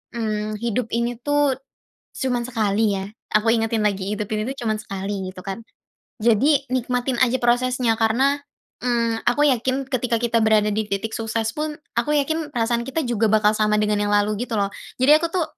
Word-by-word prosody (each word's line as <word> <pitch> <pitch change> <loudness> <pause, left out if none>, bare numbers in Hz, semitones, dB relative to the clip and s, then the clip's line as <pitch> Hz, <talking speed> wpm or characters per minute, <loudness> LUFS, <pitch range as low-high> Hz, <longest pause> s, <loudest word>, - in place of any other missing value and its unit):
mmm, 215 -2 -2
hidup 235 +1 -1
ini 235 +1 0
tuh 290 0 +2 0.6
cuma 250 -3 0
sekali 220 -3 +1
ya. - - -4 0.3
Aku 215 +1 +2
ingetin 225 0 0
lagi 195 -1 -1
hidup 210 0 -3
ini 215 - -1
tuh - - -14
cuman 215 - +2
sekali 195 -1 -4
gitu 185 - -15
kan. 195 +4 -5 0.6
Jadi 260 +6 +4
nikmatin 250 0 -1
aja 255 +1 +2
prosesnya, 245 -1 +2
karena, 260 +6 +2 0.4
mmm, 230 -2 0
aku 245 +5 +3
yakin 260 +2 0
ketika 240 -3 0
kita 235 -1 +2
berada 215 -1 +3
di 210 0 -1
titik 200 +2 -2
sukses 225 0 -1
pun 305 0 -2 0.2
aku 300 - +1
yakin 300 +1 -1
perasaan 235 0 0
kita 315 +4 -1
juga 235 -4 +1
bakal 215 0 +4
sama 210 0 +2
dengan 210 0 +1
yang 205 0 0
lalu 210 +3 +1
gitu 235 - -4
loh. 200 -2 +1 0.3
Jadi 265 - +5
aku 325 +2 0
tuh 360 -3 +1
230 Hz, 180 wpm, -22 LUFS, 215-255 Hz, 0.6 s, Jadi